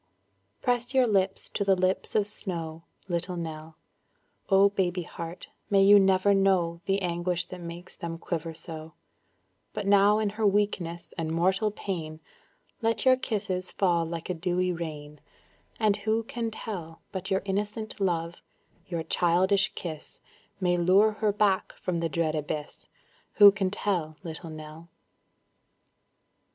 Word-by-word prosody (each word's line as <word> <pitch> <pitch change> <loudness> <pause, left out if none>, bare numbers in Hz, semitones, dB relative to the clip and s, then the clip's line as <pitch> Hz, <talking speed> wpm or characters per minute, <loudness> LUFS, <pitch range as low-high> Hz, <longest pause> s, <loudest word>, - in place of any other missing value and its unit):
Press 245 +1 0
your 260 -1 +6
lips 195 -3 +1
to 200 - -1
the 195 -1 +4
lips 185 +1 -1
of 210 -2 +3
snow, 165 -5 -5 0.2
Little 180 0 -2
Nell; 160 -1 -6 0.7
Oh 195 0 +6
baby 185 -3 -1
heart, 170 +1 -8 0.2
may 195 -1 +5
you 205 +1 +8
never 190 +1 +4
know 185 -4 +2
The 195 0 0
anguish 175 0 -1
that 180 -1 -8
makes 170 +1 -9
them 165 -1 -5
quiver 165 -1 -4
so; 160 -1 -9 0.8
But 205 - -4
now 200 +1 +5
in 215 -2 0
her 215 0 +1
weakness 195 -4 -1
and 160 -1 -2
mortal 190 +6 +2
pain, 165 -7 -5 0.6
Let 230 +2 +1
your 260 0 +7
kisses 195 -7 -3
fall 175 -4 +2
like 165 0 -5
a 180 - -1
dewy 180 +1 0
rain, 150 -3 -7 0.6
And 210 -2 +3
who 220 +2 0
can 230 0 -3
tell 175 -7 -7
But 190 0 -4
your 190 0 +1
innocent 210 +3 -3
love, 170 -2 0 0.5
your 170 -2 -3
childish 190 +5 +3
kiss 160 -4 -7 0.4
May 180 -2 +2
lure 190 +5 +5
her 215 0 0
back 200 -2 +1
from 175 -2 -3
the 165 0 -1
dread 160 +1 0
abyss; 150 -1 -5 0.5
Who 205 -1 +9
can 195 -2 -1
tell, 175 -6 -2
Little 165 0 -7
Nell. 155 +1 -10
185 Hz, 145 wpm, -28 LUFS, 165-200 Hz, 0.8 s, Who